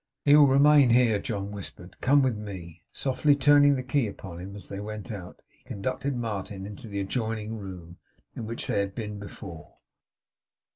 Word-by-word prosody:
'He 145 0 +7
will 150 -1 +8
remain 140 0 +6
here,' 115 -3 +4
John 100 -1 -4
whispered. 95 -3 -9
'Come 140 +2 +4
with 130 -3 +1
me!' 90 -6 -8
Softly 140 +2 +2
turning 145 0 +5
the 130 - -3
key 130 -1 +1
upon 95 -4 -8
him 95 +2 -8
as 105 - -9
they 100 - -6
went 105 +2 -6
out, 90 -4 -9
he - - -32
conducted 130 +6 -3
Martin 100 -4 -4
into 105 +3 -9
the 100 -1 -4
adjoining 110 +1 -3
room, 90 -3 -9 0.4
in 115 - -5
which 115 +1 -4
they - - 0
had 100 -1 -2
been 105 -3 -5
before. 95 -5 -10
105 Hz, 180 wpm, -27 LUFS, 100-130 Hz, 0.4 s, will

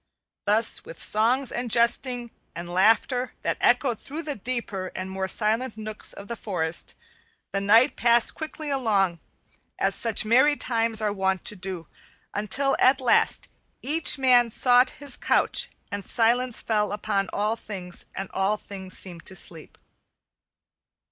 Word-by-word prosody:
Thus 215 +2 +2
with 165 - -10
songs 240 +5 +3
and 245 0 -3
jesting 235 +1 +1 0.2
and 170 +1 -6
laughter 225 +6 +2
that - - -1
echoed 245 -2 +2
through 310 +4 -6
the 300 -2 -3
deeper 220 -4 -4
and 185 0 -5
more 190 0 -3
silent 220 +4 0
nooks 215 0 -4
of 200 - -7
the 235 - -4
forest, 170 -7 -2 0.6
the 195 - -1
night 225 +5 +4
passed 235 0 +3
quickly 310 -1 -6
along, 200 -10 +1 0.6
as - - +1
such 225 -2 +2
merry 260 +7 +4
times 225 -2 -1
are 210 -1 0
wont 190 -1 -1
to 210 - -3
do, 185 -3 -6 0.5
until 260 +7 +1
at 260 +1 +5
last 255 -2 +2 0.4
each 305 +3 +3
man 250 -3 +4
sought 250 +2 +4
his 280 -3 -3
couch - - +2 0.2
and 200 0 -4
silence 240 +3 0
fell 210 -2 0
on 195 -2 0
all 210 +2 0
things 190 -6 -8
and 195 0 -4
all 195 +2 0
things 190 -2 -8
seemed 175 -3 -6
to 190 - -5
sleep. 165 -3 -6
220 Hz, 150 wpm, -25 LUFS, 195-245 Hz, 0.6 s, at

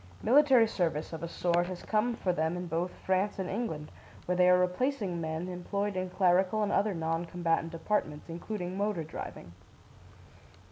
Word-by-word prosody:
Military 265 -2 +6
service, 165 -8 -1
of 160 - -5
a 170 - -3
sort, 175 +1 +1
has 180 -1 -6
come 225 +2 +1
for 185 -5 0
them 160 +1 0
in 180 - -4
both 170 +2 -1 0.2
France 190 +2 +1
and 190 -2 -2
England, 185 -9 -3 0.3
where 180 - 0
they 180 0 +5
are 180 - +7
replacing 180 0 0
men 160 +2 -3
employed 200 +3 -3
in 185 0 -2
clerical 185 +3 +3
and 205 - 0
other 205 -1 +2
non 165 0 -1
combatant 165 -1 -1
departments, 165 -3 -2
including 180 +2 -5
motor 200 -4 -1
driving. 90 - -8
180 Hz, 170 wpm, -30 LUFS, 165-205 Hz, 0.3 s, are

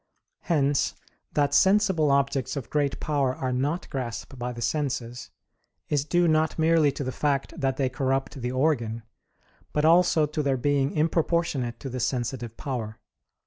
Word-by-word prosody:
Hence 145 -4 +1 0.4
that 145 -1 +1
sensible 190 -4 +4
objects 140 -1 +1
of 135 -4 -6
great 145 -2 0
power 140 -4 0
are 130 -1 -2
not 145 +7 -1
grasped 130 0 -5
by 125 +1 -3
the 120 - -8
senses, 125 -1 -2 0.6
is 145 -1 +1
due 175 +2 +2
not 155 0 +2
merely 160 -2 +4
to 140 - -4
the 130 - -3
fact 140 0 -1
that 135 -1 0
they 135 - +1
corrupt 135 +1 -2
the 125 +1 -2
organ, 125 -5 0 0.7
but 150 0 +1
also 170 -1 +5
to 150 +1 -3
their 140 -2 +1
being 140 +1 +1
improportionate 155 -6 0
to 135 - -5
the 125 - -4
sensitive 120 -2 -2
power. 120 -7 -4
140 Hz, 155 wpm, -26 LUFS, 130-155 Hz, 0.7 s, also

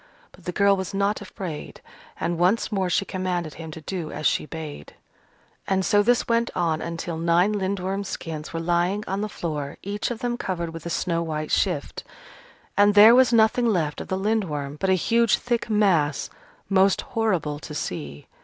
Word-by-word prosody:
But 185 - -19
the 180 - -2
girl 200 +2 +4
was 190 +1 -4
not 200 +2 0
afraid, 185 -6 -7 0.4
and 170 -1 -1
once 190 +7 +2
more 190 -3 0
she 195 - +1
commanded 180 -5 -3
him 165 0 -8
to 155 +1 -9
do 170 -1 -5
as 150 - -5
she - - +2
bade. 155 - -8 0.7
And 190 -1 +1
so 205 -2 +4
this 240 +3 +2
went 235 0 +2
on 165 -3 0
until 170 0 -4
nine 170 +5 +3
Lindworm 195 0 -2
skins 160 -5 -6
were 165 - -3
lying 175 +4 0
on 195 +2 -2
the 215 - -2
floor, 150 -7 -4
each 205 +1 -2
of 240 - -3
them 240 +1 -2
covered 170 -6 -3
with 165 0 -7
a - - -3
snow 170 0 0
white 155 -2 -3
shift. - - 0 0.7
And 205 +1 +4
there 215 +3 +9
was 255 +1 +5
nothing 230 +1 +4
left 165 -9 0
of - - -8
the 190 - -1
Lindworm 170 -9 -1
but 190 - 0
a - - +5
huge 230 +5 +3
thick 240 -1 -2
mass, 185 -9 +2 0.4
most 195 0 +3
horrible 180 -10 0
to 150 - -8
see. 75 - -5
185 Hz, 185 wpm, -24 LUFS, 165-205 Hz, 0.7 s, there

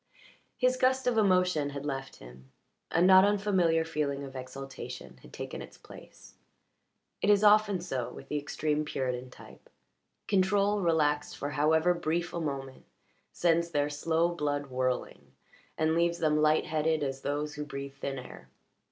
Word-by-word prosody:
His 255 0 +2
gust 260 +1 +2
of 245 -1 +2
emotion 180 -8 +2
had 140 0 -6
left 135 -2 -4
him; 65 +2 -15 0.4
a 170 - +2
not 185 0 +8
unfamiliar 190 -5 +2
feeling 145 -3 -2
of 135 -1 -9
exaltation 135 +1 -8
had - - -15
taken - - -6
its - - -11
place. - - -15 0.9
It 200 - +1
is 205 0 +5
often 210 -2 +5
so 135 -9 -3
with 135 - -11
the 150 - -2
extreme 150 +1 -1
Puritan 130 -3 -3
type; - - -15 0.6
control 200 +1 +2
relaxed 150 -4 +1
for 145 +1 -4
however 160 +4 +3
brief 170 0 -2
a 170 - -3
moment 135 -3 -5 0.5
sends 170 0 +1
their 145 -2 0
slow 160 +3 +1
blood 145 -4 -2
whirling, 130 0 -3 0.4
and 160 0 +2
leaves 170 +1 +1
them 155 -2 +2
light 155 0 +3
headed 155 0 0
as 135 -1 -3
those 150 +1 -2
who 150 - -5
breathe 140 -1 -7
thin 140 0 -5
air. 130 - -11
155 Hz, 155 wpm, -29 LUFS, 140-175 Hz, 0.9 s, not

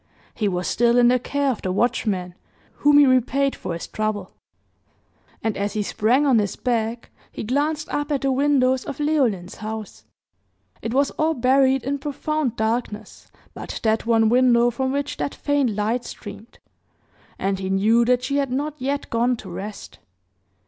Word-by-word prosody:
He 215 - -1
was 180 -2 -2
still 235 +1 +2
in 240 0 +6
the 250 0 +3
care 280 +2 0
of 240 - -5
the 185 - -2
watchman, 190 -4 0 0.4
whom 290 0 +5
he 290 - +8
repaid 265 +2 +2
for 175 - -5
his 170 - -5
trouble; 215 -1 -3 1.1
and 220 -2 -1
as 200 0 -2
he 210 - -1
sprang 240 +8 +2
on 260 -5 +4
his 205 -3 -1
back, 230 -1 -2 0.2
he - - -6
glanced 295 +6 -1
up 290 +1 -2
at 280 - 0
the 275 - +1
windows 260 -1 +2
of 280 - -7
Leoline's 255 - 0
house. 215 - -7 0.8
It 225 - -4
was 275 +3 +2
all 315 +1 +2
buried 265 +1 +3
in 280 +2 -2
profound 295 -2 -2
darkness 220 -1 -3 0.3
but - - -7
that 220 0 +1
one 225 -1 +4
window 240 0 +4
from 260 +2 -2
which 285 +1 -2
that - - -3
faint 280 -7 0
light 220 +4 -1
streamed, 215 +1 -10 0.8
and 195 0 -1
he 190 -1 -4
knew 215 +5 +3
that 250 +1 +2
she 280 +2 -1
had 275 -3 0
not 290 +3 -2
yet 275 +2 -2
gone 240 +1 +1
to 190 -4 -10
rest. 205 +4 -8
245 Hz, 170 wpm, -22 LUFS, 215-275 Hz, 1.1 s, he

